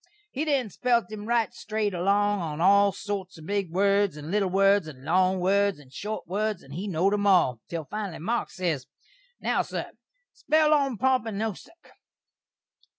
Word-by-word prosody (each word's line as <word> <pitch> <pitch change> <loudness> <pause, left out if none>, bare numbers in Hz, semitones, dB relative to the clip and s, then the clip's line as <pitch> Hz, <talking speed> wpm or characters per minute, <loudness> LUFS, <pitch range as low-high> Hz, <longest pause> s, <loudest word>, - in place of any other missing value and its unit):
He 290 +4 -2
then 270 -8 0
spelt 235 -1 +1
him 210 0 -7
right 235 -2 +1
strate 215 -1 -2
along 200 +3 +2
on 155 -2 -4
all 200 +3 +5
sorts 195 -2 -5
of 160 - -12
big 200 -1 -1
words, 200 0 +2
and 150 +2 -7
little 200 -2 +1
words, 195 -1 +3
and 135 -3 -11
long 185 +3 +2
words, 200 +2 +2
and 135 -3 -17
short 210 +8 -5
words, 210 +2 -2
and 135 - -12
he 185 +7 -4
knowd 190 +2 +1
'em 205 0 +1
all, 175 - +4
til 165 -2 -4
finally 205 -1 -5
Marks 230 +9 -2
ses, 165 -8 -2 0.5
"Now, - - +1
sur, - - -5 0.4
spell 310 0 +2
'Ompompynusuk.'" 255 - -1
200 Hz, 160 wpm, -26 LUFS, 180-215 Hz, 0.5 s, all